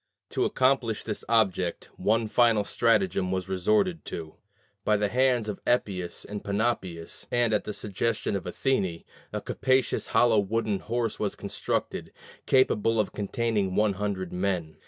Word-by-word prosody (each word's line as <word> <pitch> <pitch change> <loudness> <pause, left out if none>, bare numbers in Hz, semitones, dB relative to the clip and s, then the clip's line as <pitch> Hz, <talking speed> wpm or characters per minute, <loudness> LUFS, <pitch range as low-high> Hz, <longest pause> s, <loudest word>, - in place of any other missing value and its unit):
To - - +1
accomplish 130 -4 +1
this 105 - -4
object, 95 -6 +1
one 110 +1 +1
final 115 -2 +4
stratagem 115 - +1
was 95 -1 -2
resorted 105 - +1
to. 80 -2 -6 0.5
By 105 0 +3
the 105 0 0
hands 125 -1 +2
of 105 - -5
Epeius 95 -7 0
of 105 0 -6
Panopeus, 100 -6 -2
and 120 -2 +2
at 105 - +1
the - - -3
suggestion 105 +1 -1
of 95 - -4
Athene, 95 -11 -1 0.3
a - - -3
capacious 130 0 +1
hollow 115 -3 +4
wooden 105 0 0
horse 115 -1 -2
was 105 -2 -1
constructed, - - -3 0.4
capable 115 -4 +3
of 105 - +1
containing 105 -2 -1
one 105 -1 +3
hundred 95 -2 -3
men. 90 -4 -2
105 Hz, 145 wpm, -27 LUFS, 95-115 Hz, 0.5 s, final